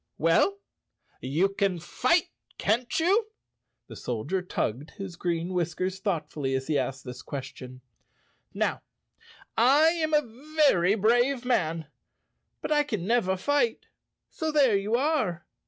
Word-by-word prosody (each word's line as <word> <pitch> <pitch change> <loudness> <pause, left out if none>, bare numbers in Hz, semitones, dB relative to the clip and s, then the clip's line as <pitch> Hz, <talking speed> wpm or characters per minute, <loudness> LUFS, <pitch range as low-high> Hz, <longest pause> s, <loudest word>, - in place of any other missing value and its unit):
"Well, 165 - +3 0.6
you 155 +9 +1
can 195 -2 0
fight, 255 - +1 0.3
can't 235 +4 0
you?" 395 +7 +3 0.6
The - - -11
Soldier 125 - -3
tugged 145 -5 -3
his 195 -3 -6
green 170 -1 -2
whiskers 180 +2 -2
thoughtfully 150 -8 -2
as 130 0 -2
he 155 - -1
asked 135 +1 -3
this 125 -1 -8
ques¬ 135 -2 -6
tion. 130 0 -11 0.7
"Now, - - -1 0.7
I 280 +7 +5
am 315 -2 0
a 295 +2 -3
very 200 - +4
brave 240 +4 +2
man, 165 -10 0 0.8
but - - -3
I 300 -1 +4
can 215 -12 -3
never 195 -4 +1
fight, 290 - 0 0.5
so 315 -1 -2
there 275 -8 +4
you 200 +3 0
are." 250 - 0
195 Hz, 135 wpm, -27 LUFS, -, 0.8 s, I